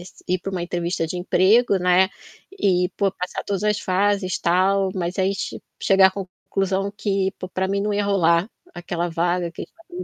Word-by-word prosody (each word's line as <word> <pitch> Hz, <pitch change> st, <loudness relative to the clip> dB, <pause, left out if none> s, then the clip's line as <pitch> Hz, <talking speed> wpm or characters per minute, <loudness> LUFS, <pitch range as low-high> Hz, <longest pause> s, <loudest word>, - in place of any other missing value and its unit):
s 180 Hz, -, -15 dB
ir 185 Hz, 0 st, +1 dB
para 195 Hz, +2 st, -6 dB
uma 180 Hz, -2 st, -2 dB
entrevista 175 Hz, -1 st, -2 dB
de 180 Hz, -, -4 dB
emprego, 195 Hz, +5 st, +3 dB
né, 180 Hz, +1 st, +4 dB, 0.4 s
e 180 Hz, -, +1 dB
pô, 195 Hz, -1 st, +2 dB
passar 180 Hz, -1 st, -5 dB
todas 200 Hz, 0 st, -3 dB
as 210 Hz, -1 st, +1 dB
fases 190 Hz, -1 st, 0 dB
tal, 190 Hz, +2 st, +2 dB
mas 180 Hz, -1 st, -3 dB
aí 190 Hz, +1 st, +2 dB
che -, -, -5 dB, 0.2 s
chegar 195 Hz, -1 st, +6 dB
a 195 Hz, +1 st, -6 dB
c-conclusão 195 Hz, +1 st, -2 dB
que 195 Hz, -2 st, 0 dB
pô, 185 Hz, -, -6 dB
pra 190 Hz, +1 st, -1 dB
mim 200 Hz, +1 st, -1 dB
não 210 Hz, 0 st, -1 dB
ia 205 Hz, 0 st, 0 dB
rolar 175 Hz, -1 st, +2 dB, 0.3 s
aquela 175 Hz, 0 st, -3 dB
vaga 175 Hz, +1 st, 0 dB
que -, -, -8 dB
estariam 350 Hz, +2 st, -12 dB
190 Hz, 190 wpm, -22 LUFS, 180-200 Hz, 0.4 s, chegar